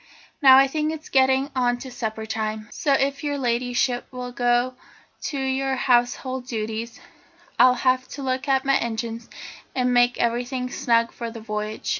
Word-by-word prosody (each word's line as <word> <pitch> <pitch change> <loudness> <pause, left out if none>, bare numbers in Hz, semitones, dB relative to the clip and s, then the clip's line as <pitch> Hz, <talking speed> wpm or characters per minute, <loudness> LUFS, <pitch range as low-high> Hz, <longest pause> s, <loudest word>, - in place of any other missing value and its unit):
Now, 265 -2 +9
I 270 - +7
think 305 +3 -1
it's 315 0 -8
getting 265 +1 +3
on 245 -1 +1
to 260 +1 -9
supper 220 -2 -4
time, 215 0 -3
so 285 - 0
if 275 +2 0
your 290 -1 -1
Ladyship 245 0 0
will 250 -1 -6
go 245 +1 +1 0.5
to 285 - -3
your 265 0 0
household 250 +1 +1
duties, 225 0 -4 0.6
I'll 250 +1 +7
have 255 0 +1
a - - -6
look 260 +1 -2
at 270 -1 +2
my 275 0 +4
engines 230 0 -4 0.5
and 250 -1 +1
make 245 0 +3
everything 245 +2 -1
snug 230 -1 +1
for 235 -1 -6
the 230 0 -9
voyage." 215 0 -4
250 Hz, 165 wpm, -23 LUFS, 235-265 Hz, 0.6 s, Now